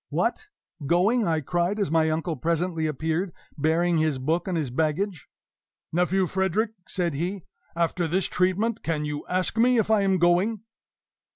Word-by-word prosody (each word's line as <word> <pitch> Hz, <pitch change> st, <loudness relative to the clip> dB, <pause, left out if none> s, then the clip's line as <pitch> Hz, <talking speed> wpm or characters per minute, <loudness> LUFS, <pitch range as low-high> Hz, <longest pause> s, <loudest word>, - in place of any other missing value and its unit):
"What! 435 Hz, -, -1 dB, 0.4 s
going?" 200 Hz, -, +3 dB
I 160 Hz, -2 st, +1 dB
cried, 175 Hz, +7 st, 0 dB
as 200 Hz, -8 st, -1 dB
my 160 Hz, -1 st, +3 dB
uncle 160 Hz, +1 st, -1 dB
presently 165 Hz, +3 st, -1 dB
appeared, 160 Hz, +5 st, -1 dB, 0.2 s
bearing 165 Hz, +3 st, +2 dB
his 155 Hz, -3 st, +1 dB
book 160 Hz, +8 st, -1 dB
and 180 Hz, -2 st, -1 dB
his 145 Hz, -6 st, -2 dB
baggage. 160 Hz, +6 st, -1 dB, 0.7 s
"Nephew 180 Hz, +2 st, +2 dB
Frederick," 190 Hz, +5 st, 0 dB, 0.2 s
said 175 Hz, -4 st, -1 dB
he, 180 Hz, +6 st, -3 dB, 0.3 s
"after 170 Hz, 0 st, 0 dB
this 185 Hz, +3 st, 0 dB
treatment, 200 Hz, +5 st, 0 dB
can 155 Hz, -2 st, -2 dB
you 150 Hz, 0 st, -4 dB
ask 185 Hz, +4 st, 0 dB
me 245 Hz, +1 st, +4 dB
if 220 Hz, -1 st, +1 dB
I 215 Hz, -2 st, +4 dB
am 195 Hz, -1 st, +2 dB
going?" 185 Hz, +5 st, +2 dB
175 Hz, 160 wpm, -25 LUFS, 160-190 Hz, 0.7 s, me